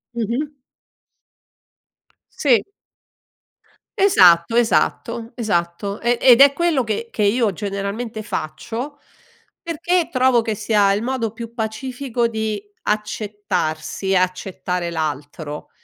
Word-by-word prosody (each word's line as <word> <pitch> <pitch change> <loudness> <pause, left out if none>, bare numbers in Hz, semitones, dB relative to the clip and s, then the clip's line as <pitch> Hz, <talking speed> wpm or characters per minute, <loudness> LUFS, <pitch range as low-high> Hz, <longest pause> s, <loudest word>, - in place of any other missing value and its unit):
Mh-mh. 245 +6 -2 1.8
Sì. 255 -6 +3 1.3
Esatto, 185 - +5
esatto, 230 0 +1
esatto, 200 -2 -2
ehm, 240 0 +2
ed 250 0 +7
è 280 - +9
quello 305 -3 +1
che 220 +1 -3
che 210 - -2
io 210 0 +2
generalmente 205 +4 -4
faccio, 225 - -5 0.6
perché 335 +1 0
trovo 255 -2 +3
che 225 -1 -2
sia 205 -1 +2
il 200 - 0
modo 235 -3 -2
più 230 0 -8
pacifico 240 +2 -2
di 220 -2 -3 0.2
accettarsi, 205 -4 -2
accettare 180 -1 -1
l'altro, 150 -1 -4
220 Hz, 100 wpm, -21 LUFS, 195-245 Hz, 1.8 s, è